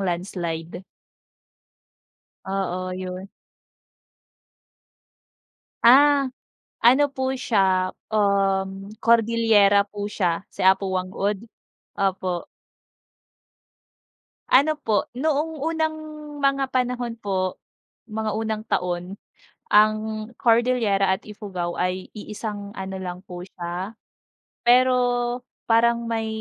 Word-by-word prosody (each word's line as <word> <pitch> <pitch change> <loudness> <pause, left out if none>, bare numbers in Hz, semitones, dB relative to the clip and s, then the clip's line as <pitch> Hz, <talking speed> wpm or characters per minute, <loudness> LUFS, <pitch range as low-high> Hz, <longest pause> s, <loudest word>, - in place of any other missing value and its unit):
landslide. 175 -2 -3 1.7
Oo, 185 -1 -2
'yun. 185 +1 -6 2.5
Ah, 280 +3 +6 0.5
ano 260 +5 +6
po 260 -1 -1
siya, 190 -6 +2 0.2
um, 195 -2 +1
Cordilera 225 -3 +4
po 205 0 -5
siya 175 -5 0
si - - -3
Apo 190 +1 +4
Whang-Od, 190 +3 -2 0.5
opo. 185 -2 -1 2.0
Ano 285 +4 +5
po, 215 -5 +1
noong 305 +3 -1
unang 315 0 0 0.5
mga 275 -1 +1
panahon 250 -2 -1
po, 185 -2 -2 0.4
mga 220 -1 -3
unang 220 -1 -2
taon, 180 +1 -2 0.5
ang 215 +1 +3
Cordillera 225 -5 +2
at 190 - -9
Ifugao 190 -5 -5
ay 185 +1 -2
iisang 210 -1 -7
ano 190 -1 -5
lang 180 -1 -6
po 180 -2 -9
siya. 180 +3 -6 0.7
Pero 255 +1 +6 0.7
parang 235 0 +2
may 225 -1 -1
205 Hz, 85 wpm, -24 LUFS, 185-235 Hz, 2.5 s, Ah